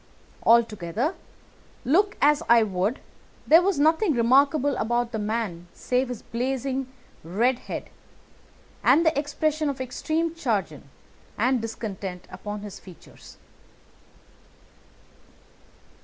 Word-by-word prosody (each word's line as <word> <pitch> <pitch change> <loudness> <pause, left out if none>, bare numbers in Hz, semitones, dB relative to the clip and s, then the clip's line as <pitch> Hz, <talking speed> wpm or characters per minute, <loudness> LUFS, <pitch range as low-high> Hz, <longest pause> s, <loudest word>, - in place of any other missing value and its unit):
Altogether, 230 - +2 0.7
look 395 +10 +2
as 295 0 +4
I 235 -1 +7
would, 200 +4 -1 0.4
there 325 +3 +7
was 385 -1 +1
nothing 320 +3 +3
remarkable 275 +4 +3
about 240 +1 0
the 220 - -3
man 210 -5 -3
save 250 +1 -1
his 245 -3 -6
blazing 260 +2 -3 0.3
red 235 +10 +1
head, - - -7 0.9
and 330 +3 +5
the 320 - +3
expression 300 +1 -1
of 275 -2 -4
extreme 315 +6 -2
chagrin 200 - -2 0.5
and 250 +2 +2
discontent 200 -5 -6
upon 205 +3 -6
his 205 -2 -9
features. 180 -3 -15
245 Hz, 105 wpm, -25 LUFS, 210-290 Hz, 0.9 s, I